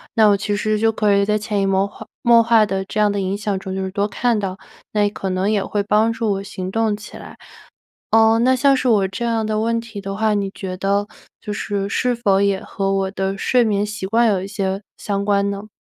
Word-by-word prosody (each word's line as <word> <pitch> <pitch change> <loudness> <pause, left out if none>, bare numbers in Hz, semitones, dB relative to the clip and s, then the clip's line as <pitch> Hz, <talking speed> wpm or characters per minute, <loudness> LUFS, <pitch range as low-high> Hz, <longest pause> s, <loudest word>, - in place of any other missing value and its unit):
那 220 -1 +6
我 200 - +4
其 205 +1 -2
实 215 +1 0
就 225 +1 +3
可 210 -2 +1
以 200 0 +3
在 210 +1 +1
潜 210 -1 -2
移 - - +1
默 195 0 +2
化 210 +2 -11
默 235 -1 +6
化 230 -1 +4
的 195 -2 -2
这 215 - -4
样 210 -1 +3
的 205 - -2
影 195 +1 -2
响 205 -2 -2
中 190 0 -6
就 190 - -2
是 190 - -4
多 200 +1 0
看 230 +2 0
到， 190 -2 -4 0.4
那 205 -1 +2
可 195 -1 -5
能 185 +2 0
也 205 -3 +1
会 205 +1 -2
帮 215 +2 +2
助 225 -2 -1
我 195 0 -2
行 185 -1 -6
动 225 0 +1
起 210 0 -11
来。 - - -11 0.8
啊， 225 0 +5
那 255 +3 +3
像 275 +2 +4
是 260 - 0
我 205 -5 +3
这 195 +5 -5
样 230 -1 0
的 215 0 -1
问 230 +1 0
题 225 -3 -8
的 195 0 -5
话， 220 0 +1
你 200 -2 -1
觉 185 -2 -5
得 200 +2 0 0.3
就 210 - -5
是 200 -1 -3
是 250 +4 0
否 200 -5 +2
也 200 -1 +1
和 195 -2 -3
我 195 -1 0
的 195 0 -2
睡 245 +5 +2
眠 205 -2 +1
习 205 -2 -5
惯 230 +4 +3
有 200 -3 +1
一 190 - -5
些 195 -1 -2 0.2
相 200 -1 -3
关 200 -1 +1
呢？ 200 +1 -6
205 Hz, 270 characters per minute, -20 LUFS, 195-220 Hz, 0.8 s, 那